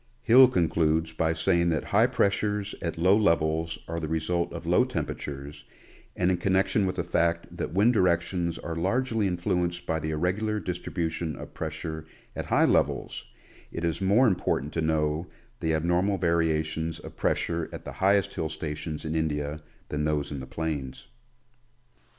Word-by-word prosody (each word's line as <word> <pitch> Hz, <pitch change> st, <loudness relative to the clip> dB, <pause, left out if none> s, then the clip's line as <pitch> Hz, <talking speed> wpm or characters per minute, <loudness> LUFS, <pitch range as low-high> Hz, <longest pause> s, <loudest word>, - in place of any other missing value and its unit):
Hill 130 Hz, +3 st, +8 dB
concludes 80 Hz, -5 st, +1 dB
by 80 Hz, 0 st, +1 dB
saying 85 Hz, +1 st, +2 dB
that 80 Hz, -3 st, 0 dB
high -, -, +3 dB
pressures 105 Hz, 0 st, 0 dB
at 85 Hz, -1 st, -3 dB
low 90 Hz, +4 st, +5 dB
levels 80 Hz, -5 st, +1 dB
are 85 Hz, 0 st, -3 dB
the 80 Hz, -, -3 dB
result 80 Hz, +2 st, -1 dB
of -, -, -7 dB
low -, -, +4 dB
temperatures, 70 Hz, 0 st, -5 dB, 0.5 s
and 90 Hz, 0 st, +2 dB
in 90 Hz, -, +1 dB
connection 95 Hz, +2 st, +2 dB
with 95 Hz, -, -2 dB
the 90 Hz, -, -1 dB
fact 85 Hz, 0 st, 0 dB
that -, -, -4 dB
wind 110 Hz, +5 st, +5 dB
directions 85 Hz, -3 st, +1 dB
are 85 Hz, -, -5 dB
largely 110 Hz, +5 st, 0 dB
influenced 90 Hz, -1 st, -1 dB
by 80 Hz, -, -1 dB
the 80 Hz, 0 st, -3 dB
irregular 95 Hz, +7 st, 0 dB
distribution 85 Hz, -3 st, -3 dB
of -, -, -10 dB
pressure 80 Hz, 0 st, -5 dB, 0.3 s
at -, -, -4 dB
high -, -, +4 dB
levels, -, -, 0 dB, 0.5 s
it 85 Hz, -, -3 dB
is 85 Hz, +2 st, -1 dB
more 100 Hz, +7 st, +4 dB
important 85 Hz, -, 0 dB
to 80 Hz, -, -1 dB
know 80 Hz, +1 st, 0 dB, 0.3 s
the 80 Hz, -1 st, 0 dB
abnormal 90 Hz, +5 st, +1 dB
variations 80 Hz, -2 st, 0 dB
of -, -, -11 dB
pressure 85 Hz, -1 st, -1 dB
at -, -, -8 dB
the -, -, -5 dB
highest 100 Hz, 0 st, +2 dB
hill 80 Hz, -, -2 dB
stations 80 Hz, 0 st, -5 dB
in 80 Hz, -, -2 dB
India 75 Hz, -1 st, -2 dB, 0.3 s
than 75 Hz, 0 st, -2 dB
those 75 Hz, -1 st, -1 dB
in 70 Hz, -, -4 dB
the 65 Hz, -, -8 dB
plains. 75 Hz, -3 st, -4 dB
85 Hz, 160 wpm, -27 LUFS, 80-90 Hz, 0.5 s, Hill